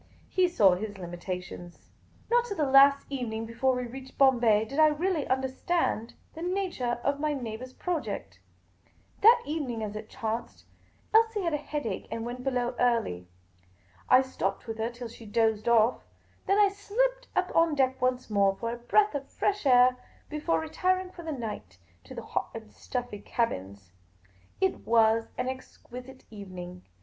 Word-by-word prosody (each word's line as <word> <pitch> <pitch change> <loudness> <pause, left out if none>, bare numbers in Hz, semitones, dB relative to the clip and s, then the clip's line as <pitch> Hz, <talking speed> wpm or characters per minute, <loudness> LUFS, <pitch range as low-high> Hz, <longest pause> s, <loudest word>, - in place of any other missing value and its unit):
He 370 -1 +3
saw 205 - +5
his 205 +2 -4
limitations. 175 0 -7 0.4
Not 485 0 +4
till 405 -5 -5
the 305 - +2
last 275 +1 +6
evening 225 -4 -3
before 240 +3 0
we 250 0 -2
reached 260 +2 -10
Bombay 235 -6 +4
did 275 +6 -4
I 310 - +8
really 310 +1 0
understand 265 -1 -1 0.2
the 325 - -9
nature 355 -10 -1
of 280 0 0
my 305 0 0
neighbour's 250 0 -6
project. 345 -1 -4 0.8
That 465 +3 +7
evening, 270 -8 -3
as 210 -1 -5
it 215 0 -7
chanced, 225 +1 -5 0.5
Elsie 445 -2 +4
had 335 -2 0
a - - +2
headache 290 -8 -4
and 230 0 -4
went 245 +1 -6
below 250 -2 0
early. 230 - +1 0.8
I 255 +1 +7
stopped 195 -7 -3
with 225 -1 -6
her 225 +1 0
till 240 0 -8
she 230 -1 -12
dozed 220 +1 +1
off; 230 +1 +4 0.5
then 395 - +3
I 410 -1 +6
slipped - - -1
up - - 0
on 330 -2 +4
deck 260 -1 +1
once 255 0 0
more 200 -2 +2
for 230 +3 -3
a - - -5
breath 410 - +2
of 280 -1 -5
fresh 405 -7 -1
air, 250 0 +6 0.3
before 305 +2 0
retiring 365 +4 -1
for 350 - -10
the 325 -1 -5
night 225 - -6 0.3
to - - -10
the - - -6
hot - - -2
and 105 - -9
stuffy 245 - -5
cabins. 100 - -3 0.7
It 380 -1 +1
was 225 0 +3
an 250 - -1
exquisite 260 0 -9
evening. 180 -3 -9
250 Hz, 165 wpm, -28 LUFS, 220-310 Hz, 0.8 s, I